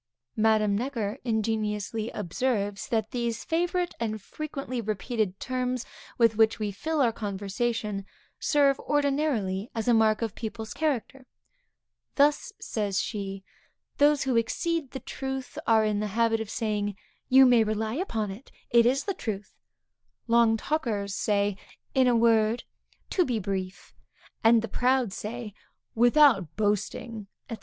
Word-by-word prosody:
Madame 215 Hz, -2 st, +3 dB
Necker 235 Hz, -1 st, -2 dB
ingeniously 220 Hz, -1 st, -1 dB
observes 205 Hz, 0 st, -2 dB
that 220 Hz, -2 st, -1 dB
these 235 Hz, -2 st, -2 dB
favorite 350 Hz, +2 st, 0 dB
and 220 Hz, -2 st, -2 dB
frequently 275 Hz, +2 st, -5 dB
repeated 215 Hz, -2 st, -2 dB
terms 255 Hz, -1 st, -2 dB, 0.3 s
with 230 Hz, -2 st, +4 dB
which 220 Hz, 0 st, +4 dB
we 210 Hz, -2 st, -2 dB
fill 310 Hz, +10 st, -1 dB
our 240 Hz, -3 st, +4 dB
conversation, 210 Hz, 0 st, -3 dB, 0.4 s
serve, 280 Hz, -2 st, +3 dB
ordinarily 275 Hz, -9 st, 0 dB
as 225 Hz, 0 st, -2 dB
a 240 Hz, -, +5 dB
mark 220 Hz, 0 st, +3 dB
of 225 Hz, -3 st, -2 dB
people's 220 Hz, -1 st, -6 dB
character. 270 Hz, -3 st, -2 dB, 0.9 s
'Thus,' 290 Hz, +1 st, +3 dB
says 205 Hz, -3 st, -2 dB
she, 195 Hz, -2 st, -4 dB, 0.6 s
'those 290 Hz, 0 st, +4 dB
who 260 Hz, -3 st, +1 dB
exceed 290 Hz, +6 st, -1 dB
the 265 Hz, -, -6 dB
truth 265 Hz, -1 st, -5 dB
are 220 Hz, -1 st, +5 dB
in 210 Hz, -1 st, 0 dB
the 210 Hz, -, -1 dB
habit 230 Hz, -1 st, +3 dB
of 220 Hz, -, -5 dB
saying, 205 Hz, -3 st, -2 dB, 0.3 s
You 265 Hz, 0 st, +8 dB
may 245 Hz, -3 st, +6 dB
rely 215 Hz, 0 st, -2 dB
upon 230 Hz, -, -2 dB
it, 220 Hz, +8 st, -11 dB, 0.2 s
it 235 Hz, -1 st, +6 dB
is 265 Hz, +3 st, +2 dB
the 395 Hz, -, -2 dB
truth; 210 Hz, -, -5 dB, 0.7 s
long 230 Hz, -1 st, +4 dB
talkers 220 Hz, -9 st, -2 dB
say, 205 Hz, -1 st, 0 dB, 0.4 s
In 260 Hz, -1 st, +4 dB
a 245 Hz, -, +4 dB
word, 225 Hz, 0 st, +3 dB, 0.5 s
to 365 Hz, -, +3 dB
be 250 Hz, -8 st, -1 dB
brief; 190 Hz, -2 st, -4 dB, 0.5 s
and 225 Hz, 0 st, +5 dB
the -, -, -2 dB
proud 250 Hz, -4 st, +1 dB
say, 220 Hz, 0 st, -6 dB, 0.4 s
Without 240 Hz, -, +4 dB
boasting,' 210 Hz, +1 st, -2 dB, 0.2 s
&c. 230 Hz, -, -3 dB
225 Hz, 140 wpm, -27 LUFS, 210-255 Hz, 0.9 s, You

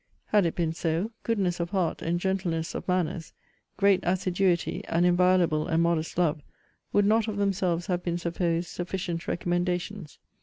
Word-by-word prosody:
Had 205 Hz, -4 st, +4 dB
it 165 Hz, -, -3 dB
been 165 Hz, -2 st, 0 dB
so, 165 Hz, +6 st, -1 dB
goodness 195 Hz, -7 st, 0 dB
of 170 Hz, 0 st, -2 dB
heart, 185 Hz, -4 st, -1 dB
and 170 Hz, +1 st, 0 dB
gentleness 175 Hz, -4 st, -1 dB
of -, -, -6 dB
manners, 180 Hz, -2 st, -1 dB, 0.4 s
great 200 Hz, -2 st, +4 dB
assiduity, 180 Hz, -1 st, 0 dB
and 170 Hz, +1 st, +1 dB
inviolable 175 Hz, -3 st, +3 dB
and 165 Hz, 0 st, +2 dB
modest 170 Hz, -1 st, 0 dB
love, 155 Hz, -4 st, +1 dB, 0.5 s
would 205 Hz, -, +3 dB
not 220 Hz, +2 st, +3 dB
of 210 Hz, -2 st, -3 dB
themselves 185 Hz, -4 st, 0 dB
have 180 Hz, -1 st, -1 dB
been 175 Hz, -1 st, -2 dB
supposed 170 Hz, 0 st, -1 dB
sufficient 175 Hz, -1 st, -4 dB
recommendations. 175 Hz, 0 st, -2 dB
175 Hz, 155 wpm, -27 LUFS, 170-190 Hz, 0.5 s, Had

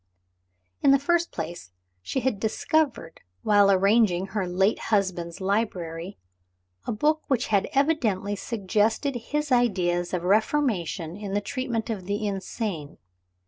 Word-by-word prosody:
In 280 Hz, -, +4 dB
the 275 Hz, -, +7 dB
first 340 Hz, +5 st, +1 dB
place 165 Hz, -, -6 dB, 0.3 s
she 265 Hz, -, -2 dB
had 250 Hz, -6 st, 0 dB
discovered, 225 Hz, -, -1 dB, 0.2 s
while 205 Hz, -1 st, +5 dB
arranging 195 Hz, -1 st, +3 dB
her 200 Hz, -4 st, -2 dB
late 190 Hz, +4 st, +1 dB
husband's 185 Hz, -5 st, 0 dB
library, 190 Hz, -3 st, -2 dB, 0.7 s
a -, -, 0 dB
book 305 Hz, +8 st, +1 dB
which 255 Hz, -3 st, 0 dB
had 200 Hz, -3 st, +2 dB
evidently 260 Hz, -10 st, +1 dB
suggested 220 Hz, +6 st, 0 dB
his 295 Hz, +5 st, -3 dB
ideas 180 Hz, -8 st, +2 dB
of 180 Hz, -2 st, -2 dB
reformation 195 Hz, -, 0 dB
in 200 Hz, -1 st, -5 dB
the -, -, +3 dB
treatment 235 Hz, 0 st, -3 dB
of 195 Hz, -5 st, -5 dB
the 205 Hz, +2 st, -1 dB
insane. 195 Hz, -5 st, -4 dB
205 Hz, 130 wpm, -26 LUFS, 185-245 Hz, 0.7 s, the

